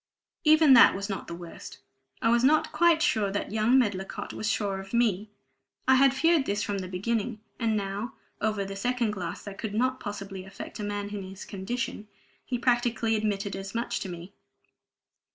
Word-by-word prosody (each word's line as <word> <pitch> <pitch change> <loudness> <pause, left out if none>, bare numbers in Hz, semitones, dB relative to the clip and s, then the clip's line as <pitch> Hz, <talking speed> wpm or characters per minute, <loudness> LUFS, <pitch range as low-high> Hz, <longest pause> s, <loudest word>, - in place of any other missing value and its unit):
Even 310 -3 +7
that 235 - +8
was 200 +2 -4
not 195 - -4
the 170 - -5
worst. 170 -1 -10 0.5
I 230 - +4
was 235 +1 +3
not 310 +3 +4
quite 335 -1 +4
sure 205 -2 +2
that 205 +1 -3
young 220 +4 +3
Medlicott 200 -6 -1
was 220 - -2
sure 200 -2 -1
of 195 +4 -6
me. 215 -3 +1 0.6
I 260 - +7
had 270 0 +5
feared 325 0 +3
this 205 +1 0
from 200 -1 -2
the 185 - -5
beginning, 215 +4 -2 0.2
and 225 -3 +1
now 200 +3 -4 0.3
(over 215 -2 0
the 195 0 -6
second 240 +2 0
glass 180 -5 -5
that 200 -1 -9
could 210 -2 -4
not 255 +3 +1
possibly 195 -3 -6
affect 190 +3 -9
a - - -3
man 205 0 -3
in 205 -1 -4
his 190 +1 -9
condition) 210 +2 -4 0.4
he 250 - -2
practically 235 -2 +1
admitted 205 -2 -1
as 195 +2 -7
much 235 +1 -1
to 190 - -5
me. 175 +2 -8
210 Hz, 190 wpm, -28 LUFS, 195-240 Hz, 0.6 s, that